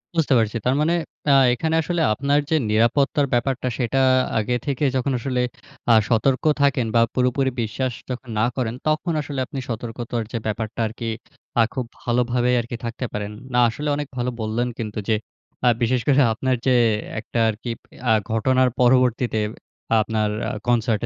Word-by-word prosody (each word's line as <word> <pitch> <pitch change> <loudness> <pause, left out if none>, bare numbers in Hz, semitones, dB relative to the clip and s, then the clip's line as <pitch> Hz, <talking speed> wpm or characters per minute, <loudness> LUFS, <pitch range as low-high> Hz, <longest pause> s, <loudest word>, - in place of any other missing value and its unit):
বুঝতে 155 -4 +2
পারছি। 110 0 0
তারমানে 150 +6 +2 0.4
আ - - +7 0.2
এখানে 160 +6 -1
আসলে 175 +1 -1
আপনার 140 +5 +1
যে, 160 - +2 0.2
নিরাপত্তার 135 +6 +2
ব্যাপারটা, 125 +1 0
সেটা 130 +2 +1 0.4
আগে 120 +3 0
থেকে 140 0 -2
যখন 130 +2 0
আসলে 125 +1 -1 0.5
আ - - +8 0.2
সতর্ক 130 +3 +2 0.2
থাকেন 135 -4 +3
বা 115 - +6
পুরোপুরি 130 +1 +1
বিশ্বাস 120 +4 -2 0.2
যখন 125 0 -6
না 110 - +3
করেন 120 -3 -1
তখন 155 +3 +1
আসলে 145 -2 -5
আপনি 135 -1 -6
সতর্কতার 115 0 -4
যে, 120 - -2
ব্যাপারটা 110 +1 -3
আরকি 115 +1 -5 0.5
আ - - +7
খুব 130 -3 -2 0.2
ভালোভাবে 120 0 +1
আরকি 120 +1 -4
থাকতে 120 +2 -4
পারেন। 105 0 -3 0.2
না, 125 - +3
আসলে 150 +6 -5
অনেক 145 -1 -3
ভালো 125 0 0
বললেন 110 +3 -1
কিন্তু, 110 -1 -4
যে, 110 - +4 0.5
আ - - +5
বিশেষ 120 +1 +2
করে 140 0 +5
আপনার 130 +3 0
যে, 130 -1 +4 0.4
একটা 115 +1 -4
আর 110 - -2
কি 120 - -2 0.4
আ - - +6 0.2
ঘটনার 130 +3 +3
পরবর্তীতে 125 -2 +3 0.6
আপনার 110 -1 0 0.2
আ - - -3 0.2
concert 115 -3 +2
125 Hz, 165 wpm, -22 LUFS, 115-135 Hz, 0.6 s, আ